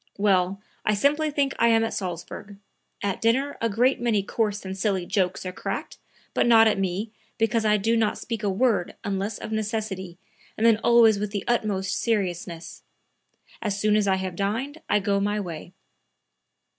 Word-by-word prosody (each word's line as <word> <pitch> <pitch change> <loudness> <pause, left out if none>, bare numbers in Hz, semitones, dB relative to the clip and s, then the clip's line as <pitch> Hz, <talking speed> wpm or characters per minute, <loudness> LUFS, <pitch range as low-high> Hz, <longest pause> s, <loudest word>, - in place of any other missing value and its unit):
Well, 195 -1 +2 0.2
I 210 - +2
simply 295 +8 +2
think 285 -2 0
I 235 - +5
am 225 -1 +4
at 225 - -2
Salzburg. 190 +2 -6 0.5
At 200 -2 -2
dinner 265 +5 +1
a 230 - +1
great 245 +5 +2
many 220 -4 +1
coarse 210 -1 -2
and 190 0 -4
silly 190 -2 0
jokes 190 -1 -1
are 185 - -3
cracked, - - -5 0.3
but - - +2
not 225 -1 +7
at 210 -2 +1
me, 195 +3 -2 0.3
because 225 0 +1
I 210 0 +4
do 225 +3 +1
not 225 -2 +1
speak 230 -3 -5
a 205 - 0
word 200 -2 +1
unless 200 +1 -2
of - - -7
necessity 210 -5 -3 0.4
and 220 - +1
then 230 -2 +6
always 225 -2 +5
with 210 0 -2
the 200 -1 -3
utmost 205 -5 0
seriousness. 175 -6 -2 0.8
As 205 -2 -2
soon 210 0 +3
as 210 -1 +2
I 190 - +3
have 190 -1 -4
dined 235 - -2
I - - +4
go 200 0 +1
my 205 +1 0
way." 175 -3 -6
210 Hz, 180 wpm, -25 LUFS, 195-225 Hz, 0.8 s, not